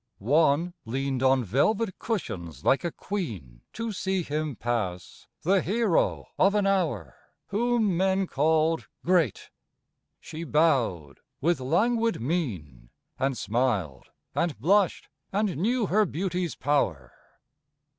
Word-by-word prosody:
One 150 Hz, -, +2 dB
leaned 135 Hz, +2 st, -2 dB
on 130 Hz, -1 st, +4 dB
velvet 185 Hz, -, +1 dB
cushions 90 Hz, -, -4 dB
like 135 Hz, -, +3 dB
a 170 Hz, -, -1 dB
queen 100 Hz, -, -5 dB
To 230 Hz, 0 st, -3 dB
see 190 Hz, -2 st, -1 dB
him 150 Hz, -2 st, -3 dB
pass, 105 Hz, -7 st, -3 dB, 0.2 s
the 190 Hz, +3 st, +3 dB
hero 210 Hz, -1 st, +1 dB
of 200 Hz, +2 st, +4 dB
an 205 Hz, -1 st, +2 dB
hour, 190 Hz, -5 st, 0 dB, 0.3 s
Whom 220 Hz, -3 st, +1 dB
men 190 Hz, +1 st, +2 dB
called 160 Hz, +1 st, +1 dB, 0.2 s
great. 170 Hz, -, +1 dB, 0.7 s
She 160 Hz, +2 st, -7 dB
bowed 130 Hz, -, +1 dB, 0.2 s
with 165 Hz, +2 st, +1 dB
languid 230 Hz, -, +1 dB
mien, 95 Hz, -, -3 dB, 0.3 s
And 135 Hz, -1 st, 0 dB
smiled, 105 Hz, -, -1 dB, 0.2 s
and 170 Hz, -4 st, -1 dB
blushed, 190 Hz, -, +2 dB, 0.2 s
and 200 Hz, -2 st, 0 dB
knew 225 Hz, -, +1 dB
her 210 Hz, +2 st, +2 dB
beauty's 180 Hz, 0 st, -2 dB
power. 80 Hz, -, 0 dB
160 Hz, 115 wpm, -27 LUFS, 125-195 Hz, 0.7 s, on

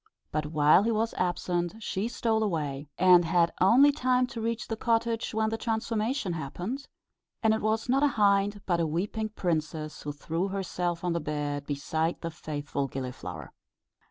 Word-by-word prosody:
But 155 Hz, 0 st, -1 dB
while 150 Hz, +2 st, +5 dB
he 220 Hz, -, +1 dB
was 225 Hz, +1 st, 0 dB
absent 175 Hz, 0 st, -1 dB
she 210 Hz, -1 st, -2 dB
stole 225 Hz, -2 st, 0 dB
away, 150 Hz, -8 st, -2 dB
and 180 Hz, -1 st, +7 dB
had 170 Hz, 0 st, +2 dB
only 250 Hz, +10 st, +7 dB
time 255 Hz, -2 st, +2 dB
to 230 Hz, -, -4 dB
reach 230 Hz, +1 st, -2 dB
the 225 Hz, -, -2 dB
cottage 230 Hz, 0 st, 0 dB
when 220 Hz, 0 st, +1 dB
the 225 Hz, -, -2 dB
transformation 225 Hz, -1 st, -1 dB
happened, 175 Hz, -, -5 dB, 0.6 s
and 220 Hz, -1 st, +5 dB
it 220 Hz, -, -1 dB
was 220 Hz, +2 st, 0 dB
not 265 Hz, +2 st, +3 dB
a 290 Hz, -, +5 dB
hind 200 Hz, 0 st, +3 dB
but 175 Hz, -2 st, +1 dB
a 165 Hz, -, +1 dB
weeping 205 Hz, +7 st, -2 dB
princess 155 Hz, -5 st, -2 dB
who 145 Hz, -, -4 dB
threw 165 Hz, +5 st, -2 dB
herself 180 Hz, -3 st, -2 dB
on 175 Hz, -1 st, 0 dB
the 170 Hz, -, 0 dB
bed 145 Hz, -2 st, -3 dB
beside 160 Hz, +3 st, -1 dB
the 165 Hz, -, -4 dB
faithful 145 Hz, -3 st, -4 dB
Gilliflower. 125 Hz, -, -6 dB
180 Hz, 170 wpm, -28 LUFS, 155-220 Hz, 0.6 s, and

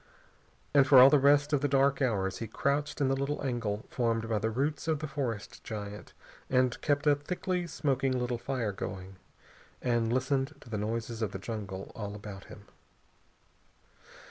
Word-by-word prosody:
And 140 Hz, -2 st, +6 dB
for 135 Hz, -, +7 dB
all 130 Hz, +2 st, +10 dB
the 150 Hz, -, +6 dB
rest 145 Hz, +2 st, +4 dB
of 145 Hz, -, +3 dB
the 145 Hz, -, +2 dB
dark 140 Hz, 0 st, +2 dB
hours 100 Hz, -7 st, 0 dB
he 115 Hz, -, -4 dB
crouched 145 Hz, +4 st, -1 dB
in 140 Hz, -, +3 dB
the 135 Hz, -, +2 dB
little 140 Hz, +2 st, -2 dB
angle 115 Hz, -5 st, -2 dB
formed 115 Hz, -2 st, 0 dB
by 110 Hz, -2 st, 0 dB
the 110 Hz, -, 0 dB
roots 140 Hz, +8 st, -2 dB
of 160 Hz, -1 st, +2 dB
the 155 Hz, +2 st, -5 dB
forest 130 Hz, -7 st, -4 dB
giant, 105 Hz, -1 st, -7 dB, 0.4 s
and 130 Hz, -1 st, +2 dB
kept 145 Hz, 0 st, +1 dB
a 145 Hz, -, +6 dB
thickly 180 Hz, +4 st, -2 dB
smoking 135 Hz, -5 st, 0 dB
little 125 Hz, -1 st, -2 dB
fire 120 Hz, -3 st, -2 dB
going, 95 Hz, 0 st, -6 dB, 0.6 s
and 120 Hz, -2 st, +1 dB
listened 135 Hz, +3 st, 0 dB
to 120 Hz, -, -14 dB
the 110 Hz, -, -1 dB
noises 115 Hz, +2 st, -3 dB
of 105 Hz, -3 st, -1 dB
the -, -, -3 dB
jungle 100 Hz, -2 st, -6 dB
all 105 Hz, -2 st, -6 dB
about 100 Hz, -2 st, -9 dB
him. -, -, -12 dB
125 Hz, 175 wpm, -30 LUFS, 110-140 Hz, 0.6 s, all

